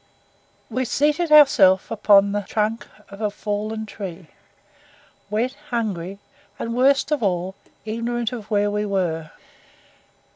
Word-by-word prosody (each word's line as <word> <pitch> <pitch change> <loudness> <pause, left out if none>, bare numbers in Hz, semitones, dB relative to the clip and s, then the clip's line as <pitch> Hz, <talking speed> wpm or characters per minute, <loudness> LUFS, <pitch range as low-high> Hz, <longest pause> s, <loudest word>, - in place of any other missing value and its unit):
We 255 +3 -2
seated 300 +7 +1
ourselves 280 -11 +6
upon 200 -2 +4
the 205 0 -1
trunk 215 +3 -2 0.2
of 200 +2 -11
a 210 - +1
fallen 215 +1 -4
tree, 185 -6 -8 1.0
wet, 230 +5 -1 0.2
hungry, 200 -6 -3 0.4
and, 230 - -4
worst 275 +4 +3
of 300 - +1
all, 185 -2 -1 0.3
ignorant 230 +2 -2
of 220 -4 -7
where 205 -1 +1
we 210 0 -1
were. 175 -6 -2
215 Hz, 120 wpm, -22 LUFS, 200-240 Hz, 1.0 s, ourselves